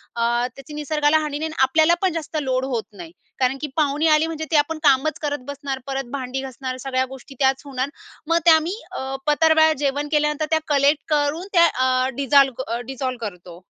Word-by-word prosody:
अ, 235 - -2 0.3
त्याची 275 +2 -11
निसर्गाला 300 +1 +1
हानी 295 -1 -3
नाही, 315 +1 -3
अन 310 - -3
आपल्याला 315 +5 +4
पण 375 -3 +1
जास्त 320 -1 -4
लोड 260 -1 -1
होत 225 - -1
नाही. 330 -1 -9 0.3
कारण 260 +1 +1
की 300 - -2
पाहुणे 300 +1 +1
आले 305 +1 +3
म्हणजे 315 -1 -4
ते 320 - +2
आपण 305 +2 +1
कामचं 275 +1 +4
करत 290 -1 -2
बसणार, 280 -1 -5
परत 270 -2 -3
भांडी 265 -1 -4
घासणार, 260 -1 -6
सगळ्या 260 0 -1
गोष्टी 265 +1 -12
त्याचं 270 +1 +1
होणार. 260 +1 -2 0.4
मग 330 +1 +3
ते - - +7
आम्ही 320 +3 +3 0.2
अ, 265 0 -4
पत्रावळ्या 315 +1 +4
जेवण 285 +1 -1
केल्यानंतर 300 0 +1
त्या 320 - +3
कलेक्ट 285 0 +2
करून 300 +5 0
त्या 340 -2 +6 0.2
अ, 255 0 +2
डिजॉल्व 275 -2 +3
अ, 235 +1 -2
डिजॉल्व 260 -1 -3
करतो. 180 -4 -8
285 Hz, 195 wpm, -22 LUFS, 265-310 Hz, 0.4 s, ते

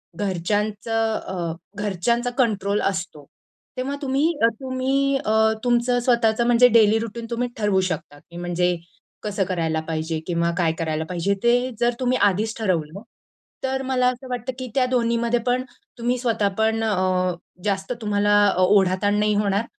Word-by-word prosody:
घरच्यांचं 210 +4 -1
अ, 170 -3 -3 0.3
घरच्यांचा 210 +5 0
कंट्रोल 205 -5 +1
असतो, 175 -6 -3 0.5
तेव्हा 270 +3 -2
तुम्ही 280 +4 +1 0.3
तुम्ही 270 +1 0
अ, 215 - +1 0.3
तुमचं 245 0 +2
स्वतःचं 235 -2 +2
म्हणजे 245 +1 +6
डेली 225 -1 +5
रूटीन 230 +1 -5
तुम्ही 245 +1 -1
ठरवू 205 -3 +2
शकता 145 -2 -6
की 170 +3 -14
म्हणजे 175 0 0 0.5
कसं 205 -1 -1
करायला 165 -3 -1
पाहिजे? 160 0 -2
किंवा 170 -1 0
काय 170 -3 +2
करायला 160 -1 -1
पाहिजे? 180 +2 0
ते 245 +2 +3
जर 240 0 +2
तुम्ही 255 0 +1
आधीच 205 +3 +2
ठरवलं, 185 -4 -2 0.6
तर 265 0 -1
मला 255 -1 +1
असं 255 +1 -10
वाटतं 250 +1 -3
की 255 - -5
त्या 260 -2 +3
दोन्हीमध्ये 235 -1 +1
पण 250 +1 +1 0.3
तुम्ही 245 +1 0
स्वतः 225 -4 +1
पण 220 0 +1
अ, 185 -3 +1 0.3
जास्त 200 +2 -1
तुम्हाला 205 -1 +2
अ, - - -2
ओढा-ताण 195 +1 +3
नाही 210 0 +2
होणार 205 +1 +1
215 Hz, 150 wpm, -23 LUFS, 185-245 Hz, 0.6 s, म्हणजे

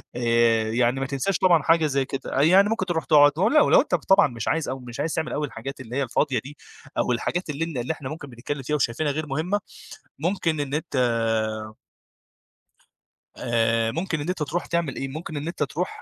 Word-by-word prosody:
آآ، 115 -2 +2
يعني 120 +2 +1
ما 135 - -1
تنساش 140 +8 -1
طبعًا 175 -5 +4
حاجة 165 +1 +4
زي 140 -2 0
كده، 135 0 -2
يعني 190 +7 +5
ممكن 225 -4 -1
تروح 170 -3 -2
تقعد 145 -2 +6
ولو 260 - +4
لو - - +7
أنت 185 - 0
طبعًا 195 +2 +4
مش 115 -4 -6
عايز 160 -4 0
أو 130 - -4
مش 125 +1 -9
عايز 155 +2 -1
تعمل 160 -1 -2
أوي 150 0 -1
الحاجات 135 0 -7
اللي 120 +1 -8
هي 140 - +1
الفاضية 130 +1 0
دي، 145 +3 -11 0.4
أو - - +1
الحاجات 170 +8 -2
اللي 150 +3 -2
ن 165 -5 -6
اللي 125 +6 -1
إحنا 140 -4 -8
ممكن 155 -2 -8
بنتكلم 135 +4 -5
فيها 150 +4 -1
وشايفينها 145 +2 0
غير 155 +1 -3
مهمة، 160 +9 -1 0.6
ممكن 165 -2 0
إن 140 -1 -3
أنت 150 -2 -3 2.4
آآ، 115 -1 +1
ممكن 165 +3 -2
إن 150 - -4
أنت 180 -4 -1
تروح 160 +5 -3
تعمل 170 -6 -1
إيه؟ 135 - -3
ممكن 155 +2 -6
إن 150 +3 -4
أنت 170 -3 -2
تروح 165 +5 -4
145 Hz, 200 wpm, -24 LUFS, 130-165 Hz, 2.4 s, لو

